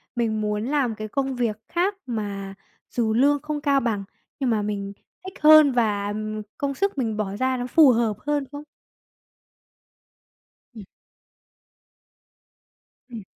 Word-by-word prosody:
mình 225 -3 0
muốn 210 0 -2
làm 265 -4 0
cái 215 0 -6
công 270 +3 -2
việc 235 -4 -1
khác 365 +4 0
mà 200 -5 -4 0.4
dù 225 -3 0
lương 280 +4 +3
không 300 -1 -4
cao 280 -1 +3
bằng, 225 -5 -2 0.4
nhưng 265 -3 0
mà 220 -2 +1
mình 200 -1 -4 0.3
thích 375 - -7
hơn 305 -1 +8
và, 210 -5 0
ừm, 215 +1 -4 0.2
công 280 -1 -2
sức 395 -1 -1
mình 225 -5 -1
bỏ 200 -2 -3
ra 260 +2 0
nó 245 0 -3
phù 295 +1 +6
hợp 225 -3 +1
hơn." 295 -1 0
không? 290 0 -8 2.1
Ừm. 215 -4 -10 2.2
Ừm. 230 -4 -8
235 Hz, 145 wpm, -24 LUFS, 215-280 Hz, 2.2 s, hơn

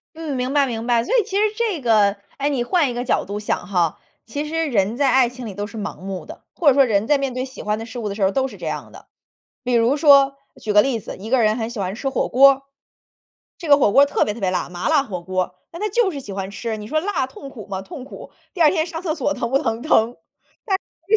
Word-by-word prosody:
嗯， 315 -3 -4
明 255 0 -2
白 285 -1 +4
明 235 -2 -4
白， 235 -1 +3
所 - - -3
以 465 - +4
其 395 -1 -3
实 420 - +3
这 435 -7 -1
个 215 -4 +3 0.2
哎， 285 +1 0
你 265 -4 0
换 310 0 +2
一 - - -4
个 245 - -2
角 - - +1
度 205 +2 -4
想 205 -4 -2
哈， 175 -5 0 0.3
其 285 +6 -4
实 325 +2 -1
人 215 -3 0
在 275 -2 +3
爱 255 -2 +4
情 250 0 -9
里 210 - -6
都 205 +2 -4
是 225 - -10
盲 210 - -5
目 190 -1 -6
的， - - -11
或 340 - -1
者 280 - +8
说 275 +1 +5
人 215 -4 +1
在 290 +1 +3
面 275 -1 -1
对 255 +1 -2
喜 265 +1 -10
欢 210 0 -1
的 225 - -6
事 235 +1 -7
物 215 -3 -3
的 200 - -5
时 205 - -2
候 190 - +4
儿 - - -3
都 265 +4 0
是 - - -11
这 - - -8
样 - - -4
的。 - - -14 0.6
比 250 - -2
如 235 +3 +3
说 280 -2 +6 0.2
举 215 - -2
个 210 - +7
例 245 -1 0
子， - - -8
一 210 +4 -7
个 260 0 +3
人 215 +1 +2
很 225 0 -2
喜 235 -2 -7
欢 190 -1 -2
吃 270 +6 -3
火 265 - -1
锅 275 +3 +7
儿。 270 - -11 1.0
这 335 - -7
个 285 - +8
火 235 -8 +3
锅 280 +1 +6
特 - - +1
别 210 - -3
特 235 - -10
别 190 -2 +1
辣， 180 - -1
麻 175 0 -3
辣 310 -3 +4
火 185 -8 -5
锅 185 +1 -1
儿， 180 - -16 0.2
那 335 - -8
他 425 - 0
就 430 0 +2
是 285 -5 -6
喜 205 - -9
欢 195 0 -4
吃， 220 +2 -4
你 210 -1 -8
说 310 +7 0
辣 330 -7 -1
痛 270 +1 -11
苦 230 -7 -10
吗？ 190 -1 -4
痛 225 +6 -9
苦， - - -11 0.2
第 365 - -8
2 310 -3 +7
天 320 -3 0
上 330 -1 -6
厕 320 -4 -1
所 290 -2 -1
疼 245 -3 -3
不 270 - +3
疼？ 230 -5 -2
疼。 235 -6 +3 1.0
但 440 - +5
250 Hz, 310 characters per minute, -21 LUFS, 210-285 Hz, 1.0 s, 者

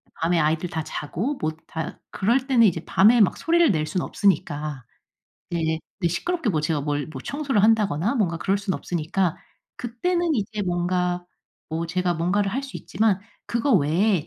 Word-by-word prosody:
밤에 165 +1 +1
아이들 160 +3 +1
다 160 -2 -3
자고 195 - -3
뭐 155 0 0 0.2
다 160 0 -5
그럴 245 +7 +1
때는 235 -5 +5
이제 165 -3 -1
밤에 220 +4 +5
막 195 - +3
소리를 335 -5 +3
낼 155 -3 0
순 180 +3 -2
없으니까 150 - 0 0.7
네네. 160 -2 -1 0.2
네. 170 - +2
시끄럽게 330 - -1
뭐 155 -3 0
제가 150 -2 0
뭘 145 -1 -1
뭐 135 -4 -8
청소를 275 -7 0
한다거나 215 - +3
뭔가 180 -8 +1
그럴 195 +4 0
순 195 -2 -2
없으니까 175 +1 -1 0.4
그때는 335 +8 -1
이제 210 -1 -2
뭔가 180 0 0 0.5
뭐 165 +1 -2
제가 180 +1 0
뭔가를 195 +4 0
할 270 - -1
수 275 - -7
있지만 215 -3 +1 0.3
그거 235 +3 +1
외에 175 +2 +2
185 Hz, 330 characters per minute, -24 LUFS, 160-225 Hz, 0.7 s, 때는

